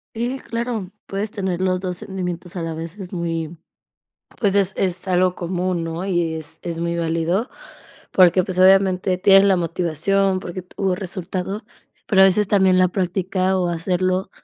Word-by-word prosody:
Sí, 245 +4 -2
claro, 230 -6 -4 0.2
puedes 205 +2 -3
tener 190 -3 -2
los 185 -1 +1
2 180 -2 -4
sentimientos 180 -2 -5
a 175 - -3
la 165 -1 -4
vez, 165 +5 -7
es 180 -2 -8
muy, 165 -1 -3 0.8
pues, 200 -4 +1
es 195 -1 +2
es 185 0 -2
algo 180 0 +2
común, 180 -1 -2
¿no? 165 +3 -4
Y 175 -4 0
es 160 -1 -8
es 170 -2 -5
muy 170 0 -1
válido 165 +6 0 0.6
porque, 185 0 +5
pues, 185 0 -4
obviamente 185 -1 +4
tienes 195 +1 +6
la 195 -1 +4
motivación 180 +3 0
porque 185 0 -6
tuvo 190 0 -2
resultado, 190 +2 -5 0.4
pero 190 -3 +5
a - - +9
veces 195 +2 +3
también 190 -3 +4
la 185 -1 +4
práctica 185 0 0
o 180 -1 0
hacerlo, 185 +2 -1
185 Hz, 165 wpm, -21 LUFS, 175-195 Hz, 0.8 s, a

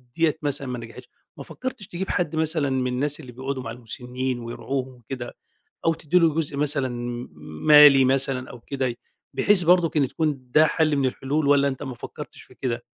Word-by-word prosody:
ديّة 160 -2 +2
مثلًا 145 -2 -2
ما 125 -1 -4
نجحتش 120 +2 -11 0.3
ما 140 - -7
فكرتش 245 - -6
تجيب 185 +2 -5
حد 170 -3 -1
مثلًا 155 -2 0
من 130 -1 0
الناس 145 +4 -2
اللي 130 -5 -10
بيقعدوا 130 +1 -5
مع 115 - -5
المسنين 125 +1 -4
ويرعوهم 130 +2 -4
وكده، 120 +1 -7 0.5
أو 165 - +3
تدي 160 +3 +1
له 165 -3 +3
جزء 150 -3 -2
مثلًا 140 -2 +1
م 120 0 -5 0.4
مالي 150 -3 +9
مثلًا 130 -1 +1
أو 120 - -10
كده، 130 -1 -3 0.4
بحيث 205 -3 +4
برضك 175 -1 +4
كان 145 -4 +2
تكون 140 -5 -3
ده 155 +4 +5
حل 155 -1 +1
من 135 -2 +2
الحلول، 140 +4 -2
والّا 140 0 +4
أنت 135 0 -5
ما 135 -3 -5
فكرتش 120 - -9
في - - -18
كده؟ 120 -2 -3
140 Hz, 190 wpm, -24 LUFS, 125-155 Hz, 0.5 s, مالي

